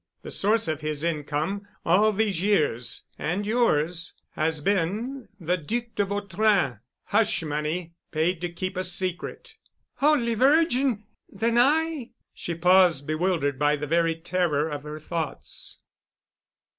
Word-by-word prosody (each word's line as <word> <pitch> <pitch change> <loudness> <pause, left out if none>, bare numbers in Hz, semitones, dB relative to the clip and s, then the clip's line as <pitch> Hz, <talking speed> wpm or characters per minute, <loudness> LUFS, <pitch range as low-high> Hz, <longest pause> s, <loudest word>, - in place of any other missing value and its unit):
The - - -7
source 215 0 +2
of 155 -1 -2
his 155 -1 -3
income, 165 +5 -2 0.2
all 200 +6 +4
these 205 -4 0
years—and 175 - 0
yours—has 170 -6 0
been—the 200 - -1
Duc 225 +9 -2
de 205 - +1
Vautrin—hush 200 - 0
money 155 +3 -3 0.2
paid 165 +2 0
to 175 - -2
keep 185 +3 -4
a 185 - 0
secret——" 180 -1 -3 0.4
"Holy 280 -5 +3
Virgin—! 265 -3 +3 0.3
Then 230 +3 +1
I——?" 300 0 +2 0.2
She 170 - -4
paused, 180 -3 +4
bewildered 155 -3 0
by 150 0 +3
the 150 0 -4
very 165 +2 +2
terror 160 -3 0
of 145 -2 -4
her 150 +1 -7
thoughts. 160 -1 -5
180 Hz, 120 wpm, -26 LUFS, 155-210 Hz, 0.4 s, all